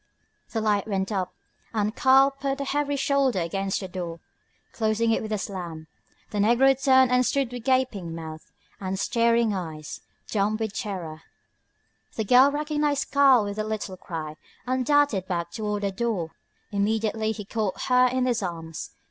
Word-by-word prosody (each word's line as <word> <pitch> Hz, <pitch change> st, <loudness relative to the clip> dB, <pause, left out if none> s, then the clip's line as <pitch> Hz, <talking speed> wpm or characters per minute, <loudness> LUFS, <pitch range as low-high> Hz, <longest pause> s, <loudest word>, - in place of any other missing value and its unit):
The 225 Hz, -, -2 dB
light 210 Hz, -2 st, +1 dB
went 195 Hz, -1 st, -1 dB
up, 185 Hz, -3 st, -1 dB, 0.4 s
and 210 Hz, +1 st, 0 dB
Karl 270 Hz, +1 st, +5 dB
put 275 Hz, 0 st, -3 dB
a -, -, -1 dB
heavy 285 Hz, +1 st, -1 dB
shoulder 275 Hz, -4 st, +1 dB
against 195 Hz, +4 st, -2 dB
the 190 Hz, -, -5 dB
door, 175 Hz, -2 st, -6 dB, 0.5 s
closing 225 Hz, +1 st, +1 dB
it -, -, +1 dB
with 220 Hz, -, -6 dB
a 215 Hz, -, +1 dB
slam. 175 Hz, -5 st, -6 dB, 0.5 s
The 210 Hz, -, -2 dB
negro 240 Hz, +6 st, +5 dB
turned 260 Hz, -2 st, +5 dB
and 250 Hz, 0 st, +4 dB
stood 270 Hz, -1 st, 0 dB
with 245 Hz, -2 st, -6 dB
gaping 240 Hz, -11 st, 0 dB
mouth 160 Hz, -1 st, -9 dB, 0.3 s
and 190 Hz, -1 st, -3 dB
staring 230 Hz, -1 st, +2 dB
eyes, 160 Hz, -5 st, -6 dB, 0.3 s
dumb 210 Hz, +1 st, 0 dB
with 220 Hz, -2 st, -3 dB
terror. 180 Hz, -9 st, -5 dB, 0.9 s
The 220 Hz, -, -1 dB
girl 255 Hz, +5 st, +7 dB
recognised 295 Hz, 0 st, -1 dB
Karl 275 Hz, -5 st, +6 dB
with 205 Hz, +1 st, -4 dB
a -, -, +1 dB
little 215 Hz, -3 st, -4 dB
cry, 155 Hz, -4 st, -6 dB, 0.3 s
and 255 Hz, 0 st, 0 dB
darted 285 Hz, -9 st, +2 dB
back 170 Hz, -2 st, -2 dB
toward 210 Hz, -2 st, -3 dB
the 200 Hz, -, 0 dB
door. 190 Hz, -6 st, -2 dB, 0.4 s
Immediately 220 Hz, +1 st, 0 dB
he 210 Hz, -2 st, -7 dB
caught 210 Hz, -2 st, -2 dB
her 250 Hz, 0 st, +4 dB
in 255 Hz, 0 st, 0 dB
his 240 Hz, -3 st, +1 dB
arms. 165 Hz, -3 st, -5 dB
215 Hz, 165 wpm, -25 LUFS, 190-255 Hz, 0.9 s, girl